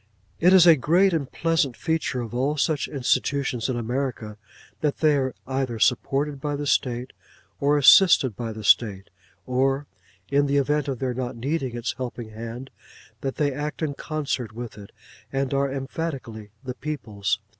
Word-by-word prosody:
It 180 +2 +5
is 185 -2 +8
a 170 -2 +8
great 175 +7 +3
and 145 -5 -2
pleasant 165 -6 0
feature 160 -5 -1
of 115 -1 -7
all 135 +5 0
such 150 -1 0
institutions 135 -2 0
in 125 - -1
America, 120 -3 -3 0.4
that 150 -2 0
they 155 -2 +3
are 130 -2 -1
either 130 -3 -2
supported 135 +4 +1
by 145 -1 -2
the 145 +1 -4
State 125 -2 0 0.5
or 145 +1 +3
assisted 140 - +6
by 115 +1 -4
the 110 0 -8
State; 100 0 +2 0.3
or 135 +2 +1 0.4
(in 140 0 +2
the 140 +1 +1
event 145 +1 +1
of 135 -2 -2
their 130 0 -2
not 125 -1 -4
needing 130 0 -2
its 120 - -2
helping 120 -3 -6
hand) 115 +4 -7 0.5
that 135 +1 -3
they 145 -2 0
act 150 +3 -4
in 150 -2 -1
concert 140 -7 -3
with 120 -1 -7
it, 100 -1 -12 0.4
and 135 0 -1
are 140 0 +1
emphatically 135 -6 -5
the 130 -1 -4
people's. 110 -9 -3
135 Hz, 165 wpm, -24 LUFS, 120-145 Hz, 0.5 s, is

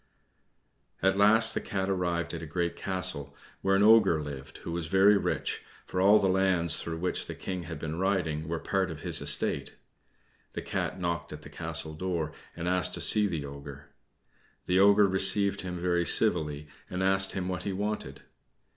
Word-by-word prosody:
At 95 0 +3
last 110 +3 +5
the - - -2
Cat 95 -1 -3
arrived 85 -3 -2
at 85 - -5
a 80 - -7
great 85 +1 -2
castle, 90 -7 +1 0.3
where 95 0 +2
an 100 - +3
Ogre 105 -8 +5
lived 70 -2 -9
who - - -6
was 85 -1 -4
very 95 +4 +4
rich, 100 - -2 0.2
for 90 - -3
all 100 +3 +6
the 100 - +1
lands 95 -3 +2
through 80 -1 -5
which 90 +2 -2
the - - -7
King 90 -2 -6
had 80 -1 -7
been 80 +2 -5
riding 90 -5 -1
were 85 +1 -3
part 95 +2 -1
of 80 -2 -8
his - - 0
estate. - - 0 0.8
The - - -6
Cat - - -4
knocked 85 -1 -3
at 75 0 -9
the - - -11
castle 80 - +1
door, 85 -2 -3 0.2
and 85 0 -5
asked 90 -1 0
to - - -5
see 105 -1 +5
the 80 -6 -4
Ogre. 70 0 -11 0.7
The 90 +1 +1
Ogre 100 +1 +5
received 95 +1 +2
him 90 -1 -6
very 85 -1 0
civilly, 75 -8 0 0.2
and 90 +1 -3
asked 95 0 +2
him 95 -2 -3
what 90 -3 -3
he 100 - -4
wanted. 105 +3 -4
90 Hz, 185 wpm, -28 LUFS, 80-95 Hz, 0.8 s, all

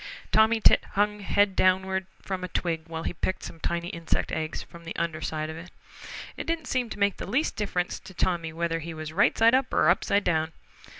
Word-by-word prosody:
Tommy 220 +1 +5
Tit - - +6
hung 210 +1 +1
head 200 0 +2
downward 190 0 +2 0.2
from 190 -1 -4
a - - -2
twig 165 -2 -2
while 160 0 -5
he - - -2
picked 185 - -2
some 165 - -8
tiny 170 +1 -2
insect 170 -1 -2
eggs 155 0 -3
from 170 0 -14
the 165 - -6
under 165 -2 -2
side 155 -1 -2
of 160 0 -6
it. 175 +2 -9 0.7
It - - -6
didn't 330 -1 -1
seem 250 -3 -1
to - - -6
make 200 -1 +2
the - - -6
least 275 +9 +1
difference 180 -4 -2
to 190 -1 -13
Tommy 170 -2 0
whether 165 0 -1
he 165 0 -6
was 155 0 -6
right 200 +4 +3
side 225 +1 +6
up 260 0 +2
or 155 - +4
upside 200 +3 +3
down. 160 -1 0
180 Hz, 220 wpm, -27 LUFS, 165-205 Hz, 0.7 s, Tit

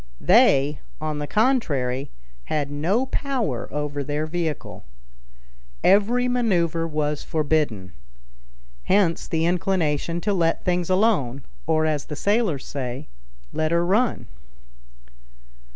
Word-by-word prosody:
They, 150 - +4 0.2
on 155 -1 -3
the 145 - -3
contrary, 145 - +1 0.4
had 145 -2 -2
no 180 - +1
power 255 - -2
over 145 0 -3
their 150 +2 -2
vehicle. 160 -2 -4 1.0
Every 225 +6 +4
maneuver 175 -10 +1
was 150 -2 -1
forbidden. 145 - -1 0.9
Hence 190 -4 +2
the 160 0 0
inclination 170 -2 0
to 205 +2 0
let 165 -3 +1
things 180 -1 0
alone, 185 - +1 0.2
or 160 -1 +2
as 150 -2 -1
the 150 - -6
sailors 200 - 0
say, 125 - -5 0.4
"let 155 0 0
her 170 +1 +2
run." 205 - +1
160 Hz, 110 wpm, -23 LUFS, 145-195 Hz, 1.0 s, They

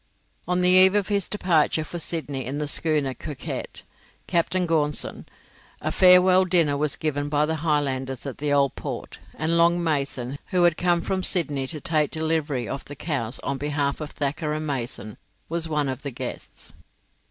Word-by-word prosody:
On 180 0 +1
the 180 - +4
eve 185 +2 +7
of 205 -1 +1
his 200 -2 0
departure 165 -6 +2
for 175 +2 -6
Sydney 150 -5 -3
in 135 +2 -3
the 150 0 -2
schooner 150 -3 +1
'Coquette' 140 -1 -6 0.4
(Captain 180 +1 +1
Gaunson), 150 -3 0 0.5
a - - -2
farewell 185 0 +6
dinner 170 -6 +3
was 150 0 -1
given 145 -2 -2
by 150 0 +2
the 160 +1 -1
Highlanders 135 -5 -1
at 140 - -6
the 145 0 -1
Old 140 -2 +3
Port, - - -6 0.2
and 165 +2 +1
Long 170 +1 +4
Mason, 140 -4 -1
who 180 -2 +2
had 170 -2 +4
come 175 0 +2
from 190 +2 -1
Sydney 150 -8 0
to 155 +2 -5
take 155 -2 +1
delivery 155 -6 -1
of 135 - -5
the 145 - -9
cows 135 -6 -1
on 140 -1 -2
behalf 145 0 -1
of 150 - -4
Thacker 150 +2 -2
and 155 0 -3
Mason, 120 -6 -4 0.3
was 165 0 -2
one 150 -2 0
of 130 0 -4
the 140 - -4
guests. 125 - -7
150 Hz, 175 wpm, -24 LUFS, 140-170 Hz, 0.5 s, eve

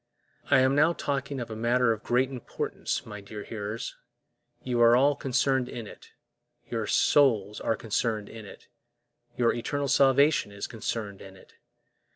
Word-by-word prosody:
I 135 -2 +5
am 130 +1 +3
now 155 +4 +4
talking 140 -3 -3
of 120 -2 -6
a - - -5
matter 120 +2 +2
of 110 - -8
great 125 +2 +1
importance, 125 -3 -4
my 105 -2 -8
dear 105 +1 -8
hearers; 110 +1 -5 0.7
you 120 -2 0
are 115 0 +7
all 140 +3 +4
concerned 130 -1 0
in 120 -2 -6
it, - - -13 0.6
your - - -2
souls 110 -8 +3
are 115 - 0
concerned 110 -1 -2
in 110 -1 -10
it, 100 - -13 0.7
your 120 -1 +3
eternal 140 +4 -2
salvation 140 -2 +3
is 100 0 -6
concerned 110 -3 -5
in 95 -1 -12
it. - - -20
120 Hz, 160 wpm, -27 LUFS, 110-135 Hz, 0.7 s, are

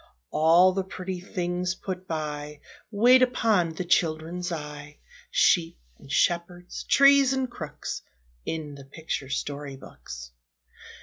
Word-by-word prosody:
All 170 +4 +5
the 195 0 -1
pretty 185 -1 -6
things 180 0 -2
put 185 -1 -6
by, 150 -2 -4 0.3
Wait 245 +4 +5
upon 220 -9 +2
the 180 - -4
children's 170 +1 0
eye, 150 -2 -7 0.3
Sheep 165 -3 +3 0.2
and 135 - -13
shepherds, 175 +3 0
trees 275 -1 +6
and 265 -1 0
crooks, 160 - -6 0.4
In 155 -3 -4
the 140 -1 -11
picture 140 -1 -5
story 140 0 -4
books. 60 - -10
175 Hz, 120 wpm, -26 LUFS, 150-185 Hz, 0.4 s, trees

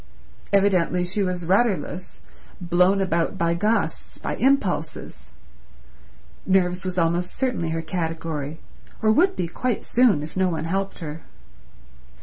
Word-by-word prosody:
Evidently 185 -3 +3
she 190 +4 -2
was 180 -2 -1
rudderless—blown 185 -2 0
about 170 -3 0
by 170 0 +1
gusts, 210 +6 -1
by - - -4
impulses. 175 - 0 1.1
Nerves 180 -1 +2
was 185 -1 -3
almost 170 +1 0
certainly 250 -11 -1
her 165 0 -2
category, 160 -3 -3 0.4
or 215 - +5
would 370 - +3
be 175 - -2
quite 240 +6 -2
soon 230 -12 +3
if 155 - -9
no 190 -1 +2
one 165 -2 -3
helped 195 +3 -2
her. 150 +2 -6
180 Hz, 125 wpm, -24 LUFS, 165-195 Hz, 1.1 s, or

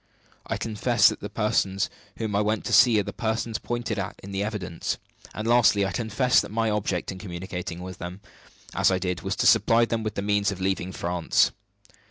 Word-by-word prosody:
I - - -1
confess 110 -2 +3
that - - -5
the - - -6
persons 95 -2 0 0.3
whom 110 -3 -2
I 100 - +3
went 105 +1 -1
to - - -2
see 120 -4 +6
are - - +1
the - - -6
persons 110 0 -2
pointed 120 -3 -3
at 95 - -5
in 100 - -8
the 95 0 -2
evidence. 100 -5 -3 0.3
And, 110 +1 -5
lastly, 115 -4 +4
I 95 - -2
confess 125 +2 +2
that - - -7
my 115 0 0
object 100 -4 -1
in 95 - -8
communicating 90 -2 -6
with 90 -1 -8
them 90 +2 -6 0.5
as - - +3
I 95 - +2
did 90 -1 -2
was - - -2
to - - 0
supply 115 +1 +5
them 115 -1 -2
with 110 -1 -4
the 100 - -2
means 100 0 +1
of 95 - -6
leaving 95 -1 -1
France. 85 -1 +1
100 Hz, 210 wpm, -26 LUFS, 95-110 Hz, 0.5 s, see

